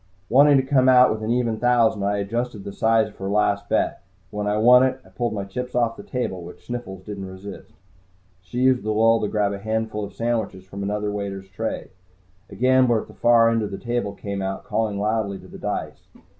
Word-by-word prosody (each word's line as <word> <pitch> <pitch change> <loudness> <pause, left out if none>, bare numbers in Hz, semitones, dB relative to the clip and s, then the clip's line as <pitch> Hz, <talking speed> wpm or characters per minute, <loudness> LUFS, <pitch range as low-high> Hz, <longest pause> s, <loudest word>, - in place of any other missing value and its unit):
Wanting 140 +3 +6
to 130 - +2
come 130 -1 +3
out 125 0 +7
with 110 - -3
an 110 - -3
even 120 -2 0
thousand, 120 -4 +3
I 100 +1 0
adjusted 110 +1 -3
the 100 - -7
size 110 0 +2
of - - -20
her 95 0 -4
last 100 0 +1
bet. - - 0 0.3
When 105 0 -3
I 105 +1 +1
won 125 +3 +7
it, 130 0 +1
I - - -17
pulled 120 -2 -2
my 100 -2 -3
chips 125 +6 -6
off 115 -2 +1
the - - -9
table, 110 -8 -4
which 85 +1 -12
Sniffles 110 -7 -6
didn't 100 -1 -6
resist. 95 +1 -10 0.7
She 95 +7 -5
used 130 -1 +4
the 110 - -4
lull 115 +1 +4
to 105 - 0
grab 100 -1 0
a 100 - -5
handful 110 0 -2
of 100 - -8
sandwiches 115 -5 -2
from 100 +1 -8
another 105 +1 -2
waiter's 100 -2 -5
tray. 95 - -4 0.6
A - - -10
gambler 130 -3 +3
at - - -18
the - - -12
far 115 -1 +4
end 115 -1 +1
of 105 - -3
the 100 - -6
table 120 -3 -2
came 100 0 -5
out, 95 0 -4
calling 110 -3 -1
loudly 105 -1 -1
to - - -14
the - - -11
dice. - - -5
110 Hz, 225 wpm, -23 LUFS, 100-120 Hz, 0.7 s, out